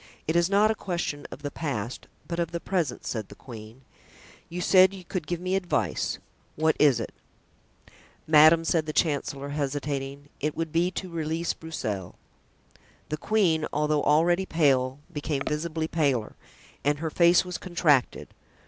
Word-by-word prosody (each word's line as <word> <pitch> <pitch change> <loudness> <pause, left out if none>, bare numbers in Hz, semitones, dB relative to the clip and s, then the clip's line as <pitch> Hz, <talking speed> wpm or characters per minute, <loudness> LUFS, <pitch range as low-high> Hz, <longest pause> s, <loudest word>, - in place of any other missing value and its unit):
"It 160 - 0
is 170 +1 +3
not 205 +2 +4
a - - +2
question 175 -8 -4
of 145 - -10
the 145 - -3
past, 125 -6 -4 0.2
but 170 0 -3
of 170 -1 0
the 170 0 -4
present," 165 -9 -2
said 110 -4 -4
the - - -11
queen; 115 0 -11 0.7
"you 175 - -5
said 185 +2 +5
you 185 - -10
could 170 -4 -4
give 175 +1 -2
me 185 +1 -1
advice—what 160 -3 -1
is 140 -6 +5
it?" 115 - -5 1.1
"Madame," 155 +2 +6
said 160 -1 +1
the 155 - -3
chancellor, 140 -3 0
hesitating, 140 -1 -3
"it 150 +1 -2
would 165 -1 -2
be 170 +3 +2
to 185 +1 -5
release 165 0 -2
Broussel." 105 - -5 0.9
The 155 - -2
queen, 170 -5 +1
although 150 0 +1
already 175 +5 +3
pale, 135 -5 +2 0.2
became 145 -1 -2
visibly 160 +1 -2
paler 140 -10 0 0.5
and 145 +1 +2
her 160 +1 -3
face 175 +2 +5
was 180 0 -5
contracted. 155 -8 +1
155 Hz, 155 wpm, -27 LUFS, 140-170 Hz, 1.1 s, Madame